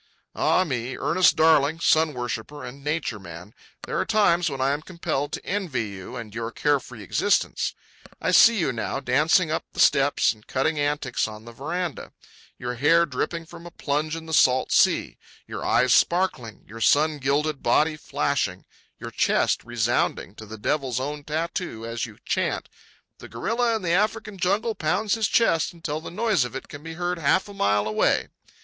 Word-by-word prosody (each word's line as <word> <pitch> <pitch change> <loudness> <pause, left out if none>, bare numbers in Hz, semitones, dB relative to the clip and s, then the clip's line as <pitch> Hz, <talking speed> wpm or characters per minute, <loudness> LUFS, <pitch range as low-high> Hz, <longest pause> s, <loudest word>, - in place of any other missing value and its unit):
Ah, 185 - +2
me, 125 -6 -3
Ernest 185 -2 +3
Darling, 155 -1 +4
sun 160 -3 +3
worshipper 120 +4 -5
and 135 +3 -10
nature 150 -7 -2
man, 85 +2 -11 0.3
there - - -2
are - - +2
times 180 -6 +2
when 135 -2 -6
I 135 +1 +2
am 145 +2 -2
compelled 155 -4 -3
to - - -5
envy 155 - -2
you 95 -2 -9
and 115 -4 -8
your 115 0 -4
carefree 130 -5 -1
existence. 205 - 0 0.4
I - - 0
see 230 -1 +7
you 160 -9 0
now, 115 +3 -3
dancing 155 +5 +2
up 160 - -1
the - - -9
steps 140 -3 +4
and 110 -1 -22
cutting 135 +3 0
antics 145 -5 -1
on 110 0 -10
the 120 - -10
veranda; 160 +6 -4 0.4
your 125 0 -4
hair 155 +7 +4
dripping 165 +4 -3
from 170 +1 -11
a - - -8
plunge 155 0 -2
in 165 0 -7
the 160 - -6
salt 130 -3 +4
sea, - - +2 0.3
your - - -6
eyes 125 -1 +3
sparkling, 170 - +1
your 115 +3 -10
sun 150 +4 +3
gilded 140 +2 0
body 155 +6 +2
flashing, 140 -10 -2 0.3
your - - -8
chest - - +1
resounding 120 -3 -1
to 110 0 -11
the 110 +1 -8
devil's 130 +2 -1
own 145 +2 -4
tattoo 155 -5 -4
as 115 +1 -3
you 110 - -14
chant: - - -1 0.5
"The - - -11
gorilla 235 0 0
in 220 - -4
the 170 - 0
African 210 +1 0
jungle 205 +6 +1
pounds 200 +5 0
his 225 -2 +1
chest 165 -10 +2
until 160 -2 -4
the - - -7
noise 215 - +1
of 125 - -6
it - - -6
can 145 - -9
be 165 +1 -7
heard 175 +1 -2
half 165 +6 +2
a 205 - -10
mile 105 - +1
away." 105 - +1
145 Hz, 180 wpm, -24 LUFS, 120-170 Hz, 0.5 s, see